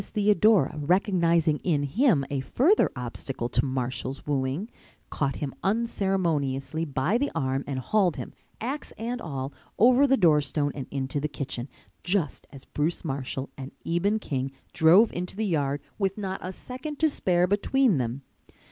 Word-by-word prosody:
Theodora 210 -6 +3
recognizing 170 -1 +2
in 150 -5 0
him 165 - +2
a 140 - 0
further 285 - +3
obstacle 125 0 -4
to - - +1
Marshall's 130 0 -3
wooing, 140 +6 -1 0.4
caught 140 -3 -1
him 140 -3 -4
unceremoniously 170 - 0
by 150 - 0
the 285 - 0
arm 135 0 0
and 140 -2 -3
hauled 180 - +2
him, - - -7 0.3
axe 270 +6 -4
and 240 +2 -4
all, 135 -3 -4 0.2
over 255 +5 +6
the 270 0 +4
doorstone 150 - +3
and 135 -3 -6
into 135 +1 -2
the 150 - -1
kitchen, 135 -3 -5 0.3
just 180 -5 -1
as 135 -2 -12
Bruce 160 +4 -2
Marshall 135 -1 -4
and 135 0 -8
Eben 190 +6 +1
King 135 -9 -3 0.2
drove 180 +8 +6
into 180 +1 -4
the 220 +2 -1
yard 145 -6 0 0.2
with 195 0 0
not 190 -2 -3
a 185 - -4
second 255 - -7
to 315 - +3
spare 180 - +2
between 205 - +2
them. 125 +3 -3
160 Hz, 155 wpm, -27 LUFS, 135-205 Hz, 0.4 s, over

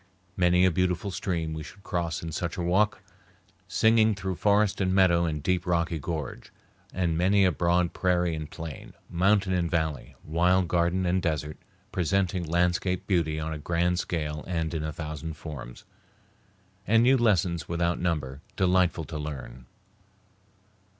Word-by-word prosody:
Many 90 0 +4
a 95 - +4
beautiful 90 +3 0
stream 85 -4 -2
we 80 - -5
should 95 +6 -12
cross 85 -6 -2
in 80 - -4
such 85 +3 -3
a 90 - -2
walk, 105 +7 +1 0.6
singing 110 +2 +3
through 95 -1 -3
forest 100 +2 +2
and 95 -1 +1
meadow 85 -3 +4
and 75 -3 -3
deep 90 -1 0
rocky 85 -1 0
gorge, 80 -5 -5 0.4
and 85 -3 0
many 95 +4 +3
a 90 - +4
broad 85 +1 +1
prairie 90 -2 +1
and 80 -1 -5
plain, 80 -1 -8 0.2
mountain 95 +2 +2
and 85 -2 0
valley, 80 -3 -2
wild 90 +3 +2
garden 85 +2 +1
and 90 +1 +1
desert, 75 -2 -2 0.3
presenting 95 0 0
landscape 90 +2 0
beauty 80 -5 0
on 80 +1 -3
a 75 - -6
grand 85 +3 0
scale 75 -4 -3
and 80 -2 -2
in 80 -2 -2
a 80 - -3
thousand 80 0 -6
forms, 70 -7 -8 1.0
and 115 +3 +5
new 130 +2 +5
lessons 95 - +1
without 85 0 0
number, 75 -6 -2
delightful 90 -3 +2
to 80 -1 -6
learn. 65 -4 -7
85 Hz, 155 wpm, -27 LUFS, 80-95 Hz, 1.0 s, and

